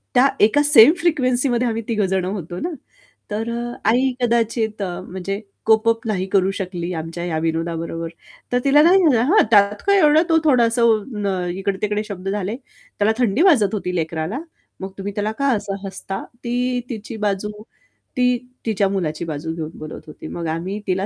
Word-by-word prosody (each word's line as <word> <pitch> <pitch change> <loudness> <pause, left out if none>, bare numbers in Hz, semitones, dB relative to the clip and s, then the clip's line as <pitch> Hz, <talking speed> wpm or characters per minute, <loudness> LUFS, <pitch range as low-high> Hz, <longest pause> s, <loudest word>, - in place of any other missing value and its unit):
त्या 255 +2 +6
एका 220 +8 +5
सेम 290 -1 +8
फ्रिक्वेन्सीमध्ये 255 -6 +1
आम्ही 230 0 -2
तिघं 215 -4 +1
जण 190 -1 0
होतो 180 -2 -5
ना, 345 - -2 0.6
तर 220 +2 -2
अ, 240 +1 -4 0.2
आई 260 +3 +3
कदाचित 225 -2 0
अ, 180 -2 -3
म्हणजे 190 +2 -4 0.3
कोप 220 +1 +4
अप 225 0 -1
नाही 190 -4 -1
करू 195 -1 +3
शकली 180 -2 -4
आमच्या 165 +1 -5
ह्या 170 -3 -2
विनोदाबरोबर, 165 0 -3 0.4
तर 245 - +2
तिला 290 +2 +5
काय 355 +3 +6
झालं 300 -11 +4
हा 430 - +6
"त्यात 205 0 +4
काय 400 0 +5
एवढं 305 -1 +5
तो 325 - +5
थोडासा 240 -5 +3
अ, 210 -4 0
इकडे-तिकडे 200 +2 -2
शब्द 195 -2 -5
झाले, 205 +1 -2
त्याला 220 -5 -3
थंडी 245 +1 +1
वाजत 260 - +4
होती 180 -3 -3
लेकराला, 160 - -2 0.4
मग 190 0 -6
तुम्ही 200 +1 -5
त्याला 210 +1 -1
का 280 - +1
असं 200 -2 -4
हसता?" 195 0 -5 0.2
ती 245 +1 -1
तिची 225 -1 -6
बाजू 200 +1 -2 0.7
ती 250 0 +3 0.3
तिच्या 210 -3 +1
मुलाची 170 -4 -2
बाजू 160 0 -4
घेऊन 160 -2 -4
बोलत 155 0 -8
होती. 155 +1 -10
मग 170 0 -5
आम्ही 175 +6 -3
तिला 190 +1 0
210 Hz, 175 wpm, -21 LUFS, 185-240 Hz, 0.7 s, सेम